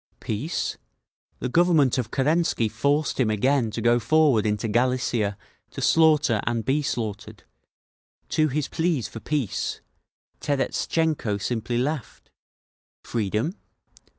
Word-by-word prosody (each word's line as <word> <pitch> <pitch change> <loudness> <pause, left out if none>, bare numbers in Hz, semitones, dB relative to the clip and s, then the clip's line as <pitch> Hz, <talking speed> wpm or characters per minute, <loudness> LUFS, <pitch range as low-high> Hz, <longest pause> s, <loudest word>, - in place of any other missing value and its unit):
Peace? 115 +10 -3 0.6
The - - -3
Government 155 -3 +3
of 115 -3 -3
Kerensky 145 -3 +1
forced 140 +9 0
him 120 -4 +3
again 120 +3 +2
to 110 +1 -5
go 120 0 +4
forward 145 -5 +3
into 105 +1 -1
Galicia 120 -3 0 0.3
to - - -8
slaughter 150 -9 +4
and 115 -2 -1
be 140 +3 +1
slaughtered; 110 -7 -4 0.9
to 155 -1 +2
his 145 0 -1
pleas 160 -7 -1
for 115 - -9
peace, 140 -4 -2 0.6
Terestchenko 145 -3 0
simply 120 +3 -2
laughed…. 140 0 -3 0.7
Freedom? 110 - -1
125 Hz, 115 wpm, -25 LUFS, 110-150 Hz, 0.9 s, go